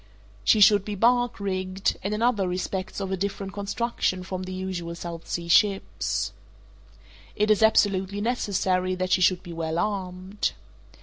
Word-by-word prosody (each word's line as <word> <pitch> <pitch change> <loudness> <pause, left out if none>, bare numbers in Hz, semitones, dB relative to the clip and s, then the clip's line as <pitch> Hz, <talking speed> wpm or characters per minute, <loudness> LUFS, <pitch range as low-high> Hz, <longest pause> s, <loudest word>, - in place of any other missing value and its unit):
She 210 - +4
should 205 -1 +7
be 210 0 -4
bark 245 +3 +2
rigged, 190 -1 -1
and 200 - -2
in 210 +2 -1
other 220 -6 +2
respects 185 +2 -3
of 195 -1 -3
a - - +1
different 195 0 -4
construction 200 -2 -1
from 185 0 -5
the 185 0 -6
usual 185 -2 -4
South 170 -1 -7
Sea 170 -1 -3
ships. 195 +3 +1 1.0
It 210 0 +2
is 215 - +3
absolutely 200 -2 +3
necessary 190 -5 0
that 185 0 -2
she 185 - +3
should 180 0 +3
be 175 -3 -8
well 165 0 -3
armed. 190 0 -2
190 Hz, 160 wpm, -26 LUFS, 185-205 Hz, 1.0 s, should